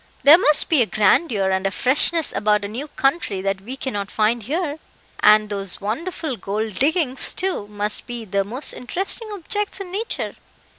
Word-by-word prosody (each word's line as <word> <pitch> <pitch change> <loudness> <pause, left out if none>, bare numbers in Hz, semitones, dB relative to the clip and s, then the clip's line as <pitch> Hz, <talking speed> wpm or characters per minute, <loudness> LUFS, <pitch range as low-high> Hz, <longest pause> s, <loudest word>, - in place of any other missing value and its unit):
"There 300 +5 +8
must 300 -5 +5
be 315 -6 +3
a 230 - +2
grandeur 205 - +2
and 190 +1 0
a - - +1
freshness 290 - +3
about 210 0 +1
a - - -3
new 245 +8 -6
country 275 - -1
that 195 0 -2
we 250 +7 -8
cannot 205 -7 -4
find 220 +2 +1
here; 300 - -3 0.4
and 215 0 +5
those 200 -2 -3
wonderful 275 - -4
gold 210 +1 -4
diggings, 285 -2 0
too, 370 - -2
must 210 0 -2
be 240 -2 -6
the 200 0 0
most 245 +8 +2
interesting 385 - -5
objects 410 +1 -4
in 380 -2 -7
nature." 430 +5 -4
240 Hz, 170 wpm, -21 LUFS, 205-320 Hz, 0.4 s, There